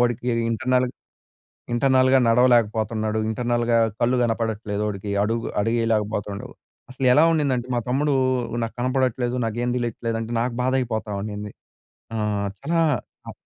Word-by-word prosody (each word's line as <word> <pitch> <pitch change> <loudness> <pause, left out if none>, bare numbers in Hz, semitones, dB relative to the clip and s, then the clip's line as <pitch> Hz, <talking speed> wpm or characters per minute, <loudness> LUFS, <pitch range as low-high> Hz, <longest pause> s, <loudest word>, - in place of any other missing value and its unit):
వాడికి 120 0 0 0.2
ఇంటర్నల్ 125 +2 +1 0.9
ఇంటర్నల్‌గా 130 +1 +4
నడవలేకపోతున్నాడు. 110 -2 +2
ఇంటర్నల్‌గా 120 0 +1 0.2
కళ్ళు 125 +2 +2
గనపడట్లేదు 110 -2 -1
ఒడికి, 100 0 -5
అడుగు 115 +2 -1
అడుగు 115 +3 0
ఏయలేకపోతుండు. 105 -2 -1 0.4
అసలు 130 0 -1
ఎలా 150 +5 +6
ఉండిందంటే 135 -6 0
మా 120 - +2
తమ్ముడు, 145 +3 +1 0.5
"నాకు 115 - -4
కనపడట్లేదు, 125 -1 0
నాకేం 120 +2 -2
తెలియట్లేదు" 115 -1 -2
అంటే 115 +1 -5
నాకు 120 +1 -1
బాధ 130 +1 +1
అయిపోతా‌వుండిం‌ది. 105 -3 -4 0.6
ఆ! - - -1 0.4
చాలా 165 +3 +1 0.5
అ - - -5
120 Hz, 120 wpm, -23 LUFS, 110-125 Hz, 0.9 s, ఎలా